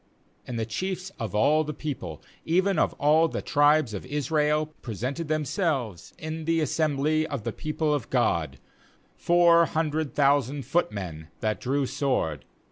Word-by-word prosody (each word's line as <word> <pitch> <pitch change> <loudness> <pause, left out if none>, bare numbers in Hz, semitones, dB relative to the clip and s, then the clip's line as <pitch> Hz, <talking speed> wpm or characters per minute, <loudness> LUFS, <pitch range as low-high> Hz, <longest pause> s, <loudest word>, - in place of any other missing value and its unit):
2And 120 - -4
the 110 - -1
chiefs 185 - -4
of 110 -3 -4
all 150 +9 +4
the 150 0 -5
people, 95 - -6 0.2
even 185 +2 +2
of - - +2
all 155 +3 +4
the - - -4
tribes 145 -4 +3
of 100 - -5
Israel, 150 +2 0
pre 115 -4 -6
sented 140 - -3
themselves 150 - -2
in 155 0 -5
the 165 0 +2
assembly 155 0 +1
of 140 -8 -4
the - - -3
people 155 0 -1
of 145 -5 -2
God, 85 - +1 0.6
four 170 -1 +5
hundred 155 -2 -1
thousand 140 -1 +2
footmen 100 - -2
that 110 -1 -1
drew 135 +2 0
sword. 125 - -1
145 Hz, 150 wpm, -26 LUFS, 120-155 Hz, 0.6 s, four